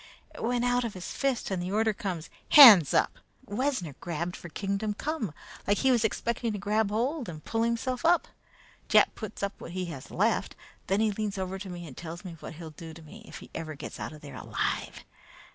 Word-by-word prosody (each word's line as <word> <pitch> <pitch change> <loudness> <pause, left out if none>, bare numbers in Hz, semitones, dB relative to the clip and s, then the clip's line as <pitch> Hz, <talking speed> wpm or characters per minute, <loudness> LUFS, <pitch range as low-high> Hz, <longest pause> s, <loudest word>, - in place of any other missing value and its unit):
It - - -9
went 245 +1 0
out 245 0 +2
of 230 -4 -4
his 180 - -6
fist, 270 -6 -1
and 185 -2 -1
the 180 +1 -3
order 220 +1 +2
comes: 180 -6 -5 0.2
'Hands 215 - +10
up!' - - +2 0.3
Wessner 205 - -1
reached 170 +1 -3
for 175 - -9
kingdom 200 +4 -2
come 285 - -3 0.4
like 205 0 +3
he 265 - +3
was 240 -3 +3
expecting 230 +1 -1
to - - -3
grab 205 +1 +1
hold 245 - -1
and 155 -2 -9
pull 225 - -1
himself 235 +2 -1
up. 340 +1 +4 0.6
Jack - - +5
puts 215 -2 -7
up 200 0 -1
what 170 - -8
he 185 0 -2
has 135 - -10
left. - - 0 0.3
Then 195 +3 +2
he 220 -1 +3
leans 205 -1 -3
over 190 0 -3
to 195 0 -7
me 175 -1 -7
and 140 -6 -10
tells 170 +2 -8
me 175 -2 -7
what - - -8
he'll 160 0 -8
do 160 +1 -10
to 165 - -12
me 210 +9 -12
if - - -9
he - - -13
ever 155 -2 -5
gets - - -8
out - - -4
of 155 -1 -12
there 140 -2 -10
alive. - - -3
200 Hz, 220 wpm, -29 LUFS, 175-230 Hz, 0.6 s, Hands